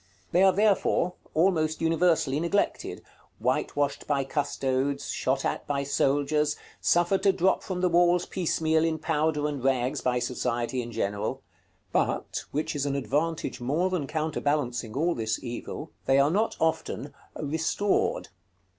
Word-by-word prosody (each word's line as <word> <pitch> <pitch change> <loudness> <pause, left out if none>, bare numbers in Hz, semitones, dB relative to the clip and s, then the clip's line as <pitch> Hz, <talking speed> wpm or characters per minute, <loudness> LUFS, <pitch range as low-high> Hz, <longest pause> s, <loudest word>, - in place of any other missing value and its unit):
They 180 - +4
are, 190 0 +7
therefore, 195 -3 +2 0.2
almost 160 -2 +2
universally 165 -3 +2
neglected, 170 +5 -1 0.3
whitewashed 145 0 -1
by 140 -2 +1
custodes, 140 -1 -1
shot 135 +1 0
at - - -2
by 140 -1 0
soldiers, 145 +2 +1 0.2
suffered 175 +3 +2
to 195 - +5
drop 190 0 +2
from 185 -2 -4
the 180 - +3
walls 175 0 +3
piecemeal 160 -3 +1
in 165 -1 +1
powder 155 -1 0
and 145 -4 -4
rags 130 +1 +1
by 125 -1 +1
society 125 0 -1
in 120 0 -7
general; 100 -2 -2 0.5
but, - - -1
which 150 +2 -2
is 145 0 -1
an 140 - -1
advantage 145 -1 -1
more 160 +9 0
than 165 -7 -1
counterbalancing 145 -7 -1
all 170 +4 +2
this 110 -3 -2
evil, 120 -2 -6 0.2
they 135 - +5
are 140 +2 +4
not 215 +5 0
often 160 0 -1 0.2
"restored." 160 +7 0
150 Hz, 140 wpm, -27 LUFS, 135-170 Hz, 0.5 s, are